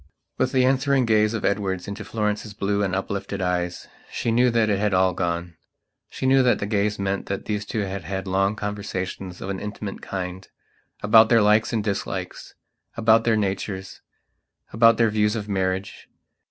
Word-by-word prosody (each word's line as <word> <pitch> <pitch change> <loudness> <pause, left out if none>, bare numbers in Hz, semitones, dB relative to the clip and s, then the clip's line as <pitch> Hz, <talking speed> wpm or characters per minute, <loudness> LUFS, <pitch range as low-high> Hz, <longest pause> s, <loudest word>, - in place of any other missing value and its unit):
With 130 - +1
the 130 -2 +3
answering 135 0 +2
gaze 110 0 +2
of 110 - -3
Edward 95 -2 -1
into 100 +2 -6
Florence's 105 -1 -3
blue 100 0 0
and 95 -2 0
uplifted 100 +1 -3
eyes, 90 -1 -2 0.2
she 115 - -1
knew 125 +2 +4
that 115 -2 +2
it 100 -2 +1
had 105 -2 +1
all 95 0 +3
gone. 85 -1 -3 0.5
She - - -5
knew 135 0 +5
that 125 -1 +3
that - - -3
gaze 105 0 0
meant 100 0 -2
that 100 - -4
those 105 -1 -2
two 110 - -2
had 100 -2 -4
had 95 +2 -4
long 95 +2 +1
conversations 95 -3 -5
of 95 - -4
an 95 - -4
intimate 105 -1 -6
kindabout 95 +4 0
their 115 -3 +5
likes 105 +2 +3
and 110 -3 -1
dislikes, 100 -2 -4 0.4
about 115 0 +4
their 115 -2 +3
natures, 95 -1 -3 0.7
about 115 +1 +5
their 115 -2 +3
views 105 0 +1
of 105 -2 -4
marriage. 95 -1 -3
105 Hz, 175 wpm, -23 LUFS, 95-110 Hz, 0.7 s, knew